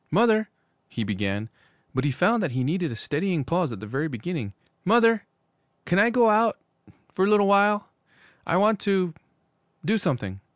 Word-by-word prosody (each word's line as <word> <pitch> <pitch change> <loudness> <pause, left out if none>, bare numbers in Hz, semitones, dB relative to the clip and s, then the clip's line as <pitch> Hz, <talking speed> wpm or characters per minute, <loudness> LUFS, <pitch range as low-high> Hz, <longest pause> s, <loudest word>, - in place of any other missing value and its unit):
'Mother 220 +2 +3 0.2
' - - -46
he 115 - -4
began; 100 +1 -3 0.5
but 130 +2 -1
he - - +2
found 225 - +2
that 175 -9 -2
he 130 0 -1
needed 170 +4 -1
a - - -5
steadying 155 +5 -2
pause 170 -1 0
at 110 - -7
the - - -7
very 135 +9 -2
beginning. 120 - -5 0.3
'Mother 230 +1 +3 0.6
can 175 - +2
I 210 +3 +5
go 240 -1 +4
out 220 +1 +3 0.6
for 185 - 0
a - - +1
little 210 -1 +4
while? 205 +1 +3 0.6
I 170 - +2
want 210 +1 +3
to 190 -5 0 0.7
do 220 +1 +2
something.' 120 - -3
180 Hz, 175 wpm, -25 LUFS, 130-210 Hz, 0.7 s, I